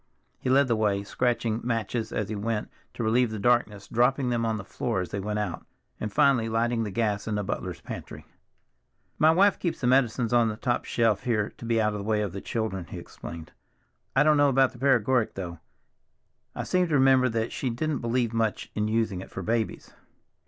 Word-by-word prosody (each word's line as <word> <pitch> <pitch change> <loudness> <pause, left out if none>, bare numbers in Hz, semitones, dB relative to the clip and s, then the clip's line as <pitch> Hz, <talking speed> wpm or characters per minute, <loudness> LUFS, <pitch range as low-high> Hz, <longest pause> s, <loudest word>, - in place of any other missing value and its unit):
He - - -2
led 135 +1 +4
the 120 - +2
way, 105 -2 +1
scratching 115 +1 -1
matches 115 -1 -2
as 105 - -2
he 110 - -4
went 105 +1 -2 0.2
to 120 - -3
relieve 120 +2 +3
the 110 - -5
darkness, 105 -2 +1
dropping 125 +2 +2
them 115 -1 0
on 110 -1 0
the 100 - -6
floor 95 - -2
as 90 - -5
they 100 - -3
went 105 +2 -3
out, 105 -5 -3 0.4
and 105 - -3
finally 120 -1 +3
lighting 115 +1 +1
the 110 - -2
gas 105 0 -1
in 105 - -1
the 105 - -1
butler's 100 - -4
pantry. - - -8 0.9
"My 155 - +6
wife 195 +5 +4
keeps 175 - -2
the - - -3
medicines 125 -2 +2
on 120 -2 +4
the 105 - -5
top 120 +2 -1
shelf 115 -4 +1
here 110 -4 0
to - - -10
be 115 -1 +1
out 105 -1 +1
of 105 - -4
the - - -5
way 105 0 +1
of 100 - -3
the 100 +2 -6
children," 110 -6 -3
he - - -8
explained. 80 -2 -9 0.6
"I 135 - +5
don't 155 0 +4
know 145 0 +5
about 135 -1 +3
the 120 - -15
paregoric, 130 -3 +2
though. 85 -4 -6 1.0
I - - -3
seem 180 -1 +1
to 155 - 0
remember 130 -1 +5
that 115 0 -1
she 130 - -2
didn't 140 +4 -2
believe 120 -1 0
much 115 -2 -1
in 105 0 -1
using 110 -4 0
it - - -10
for 95 - -6
babies." 115 +2 -2
115 Hz, 215 wpm, -27 LUFS, 105-125 Hz, 1.0 s, My